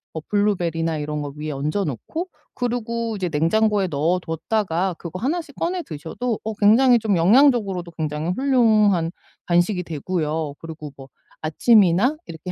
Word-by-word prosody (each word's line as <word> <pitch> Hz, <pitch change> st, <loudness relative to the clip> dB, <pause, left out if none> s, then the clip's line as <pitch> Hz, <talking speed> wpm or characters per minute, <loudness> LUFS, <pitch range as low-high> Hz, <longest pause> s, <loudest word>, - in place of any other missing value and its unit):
뭐 160 Hz, -, -3 dB
블루베리나 170 Hz, -6 st, 0 dB
이런 150 Hz, 0 st, -3 dB
거 145 Hz, -1 st, -6 dB
위에 150 Hz, +1 st, -5 dB
얹어 150 Hz, +8 st, -2 dB
놓고 155 Hz, -, -4 dB, 0.3 s
그리고 235 Hz, -2 st, -2 dB
이제 185 Hz, -3 st, -2 dB
냉장고에 195 Hz, +6 st, +2 dB
넣어 165 Hz, +4 st, 0 dB
뒀다가 180 Hz, +2 st, -1 dB
그거 170 Hz, +1 st, -7 dB
하나씩 295 Hz, -, -3 dB
꺼내 355 Hz, +1 st, -2 dB
드셔도 205 Hz, -, -4 dB
어 220 Hz, 0 st, -3 dB
굉장히 235 Hz, +4 st, +5 dB
좀 210 Hz, -5 st, +1 dB
영양적으로도 200 Hz, -, +3 dB
굉장히 155 Hz, +1 st, -2 dB
훌륭한 215 Hz, -7 st, +3 dB, 0.4 s
간식이 175 Hz, +2 st, +2 dB
되고요. 155 Hz, -2 st, -3 dB
그리고 160 Hz, -2 st, -8 dB
뭐 135 Hz, -1 st, -11 dB, 0.3 s
아침이나 200 Hz, -, +4 dB
이렇게 160 Hz, +2 st, -7 dB
180 Hz, 350 characters per minute, -22 LUFS, 160-225 Hz, 0.4 s, 굉장히